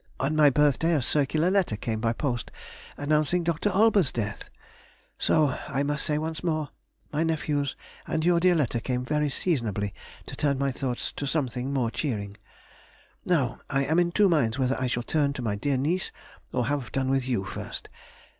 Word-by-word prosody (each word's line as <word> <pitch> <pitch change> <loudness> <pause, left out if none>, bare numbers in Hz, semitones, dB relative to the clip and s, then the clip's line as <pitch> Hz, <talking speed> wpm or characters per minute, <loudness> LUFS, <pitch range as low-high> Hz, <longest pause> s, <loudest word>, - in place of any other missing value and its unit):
On 140 +4 0
my 150 -1 +7
birthday 150 +4 +3
a 145 - +2
circular 155 +6 +2
letter 190 - +2
came 110 0 -3
by 115 -1 +2
post, 120 -1 -2 0.5
announcing 155 +4 +1
Dr. 170 +4 0
Olbers's 205 -5 +4
death. 105 -3 -4 0.7
So, 150 -5 +3
I 135 - -1
must 145 +1 0
say 150 - +1
once 160 +2 -3
more, 155 -4 -1 0.4
my 150 +2 +1
nephew's 150 -3 -1 0.3
and 160 0 -1
your 175 -1 +4
dear 180 0 +4
letter 130 -6 +1
came 125 +1 -2
very 150 +2 +1
seasonably 110 - -1 0.3
to - - -7
turn 140 -2 +1
my 140 0 0
thoughts 125 -1 -3
to 140 - -4
something 130 -3 -1
more 125 -5 0
cheering.... 105 -6 -3 0.9
Now 140 -9 +1
I 135 0 +1
am 160 +5 +2
in 175 -1 +2
two 205 +3 +4
minds 140 -10 +2
whether 130 0 +1
I 130 - +1
shall 120 -1 -1
turn 145 +1 +1
to 125 - -5
my 105 -3 0
dear 135 +6 0
niece 165 +8 0 0.4
or 125 -2 0
have 140 0 -2
done 130 -1 0
with 135 -1 +1
you 120 -7 0
first. - - -6
140 Hz, 185 wpm, -27 LUFS, 125-160 Hz, 0.9 s, my